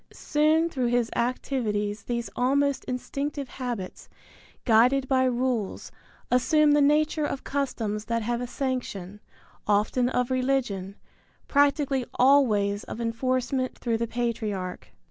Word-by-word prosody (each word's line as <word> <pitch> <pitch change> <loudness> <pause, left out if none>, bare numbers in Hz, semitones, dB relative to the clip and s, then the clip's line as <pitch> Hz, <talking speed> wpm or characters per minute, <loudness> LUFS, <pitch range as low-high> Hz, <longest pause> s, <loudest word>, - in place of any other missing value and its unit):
Soon 310 +2 +2
through 260 -7 -1
his 240 -1 +1
activities 220 -4 -1
these 235 0 -3
almost 280 +2 +1
instinctive 275 +3 -4
habits, 240 -7 -6 0.6
guided 250 +4 +4
by 260 -1 +3
rules, 245 -4 -1 0.4
assume 295 +4 +4
the 295 0 +4
nature 300 +2 +2
of 275 -2 -3
customs 225 -7 -2
that 230 -1 -1
have 240 +2 -1
a 245 - -3
sanction, 240 -8 -4 0.5
often 210 +4 +2
of 250 0 -1
religion, 250 -7 -1 0.5
practically 285 -2 +2
always 215 -7 +3
of - - -7
enforcement 255 +2 -1
through 230 -2 -1
the 235 - -1
patriarch. 215 -6 -3
250 Hz, 120 wpm, -26 LUFS, 225-275 Hz, 0.6 s, guided